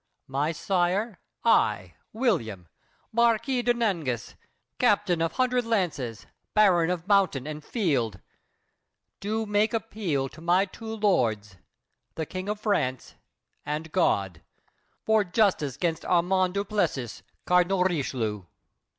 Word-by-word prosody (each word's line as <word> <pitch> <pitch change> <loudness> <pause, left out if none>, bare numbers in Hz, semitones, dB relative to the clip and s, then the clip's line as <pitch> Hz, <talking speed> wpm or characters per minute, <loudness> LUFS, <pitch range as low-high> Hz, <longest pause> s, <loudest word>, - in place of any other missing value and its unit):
My 140 +4 -1
sire, 180 +4 0 0.2
I, 90 -2 +2 0.2
William, 140 - -1 0.4
Marquis 235 +2 +2
de 245 - +2
Nangis, 170 - -1 0.5
Captain 195 -5 +2
Of 165 0 0
Hundred 250 -1 +1
Lances, 175 - -2 0.3
Baron 180 -6 +5
of 180 0 -3
Mountain 195 -10 +3
And 150 0 -6
Field, 135 - -1 1.0
do 220 +2 -2
make 210 +2 +1
appeal 195 -12 -2
to 155 - -14
my 175 +3 +3
two 220 +3 -8
lords— 110 - +1 0.6
The 160 - -3
King 185 +5 -5
of 210 0 -2
France 130 - -1 0.5
and 150 +2 -4
God, 100 - +1 0.6
for 220 -1 +4
justice 180 - +1
'gainst 165 -3 -1
Armand 180 +1 +2
du 200 0 0
Plessis, 145 - -2 0.2
Cardinal 180 +1 +3
Richelieu. 125 - -1
180 Hz, 115 wpm, -27 LUFS, 140-210 Hz, 1.0 s, Baron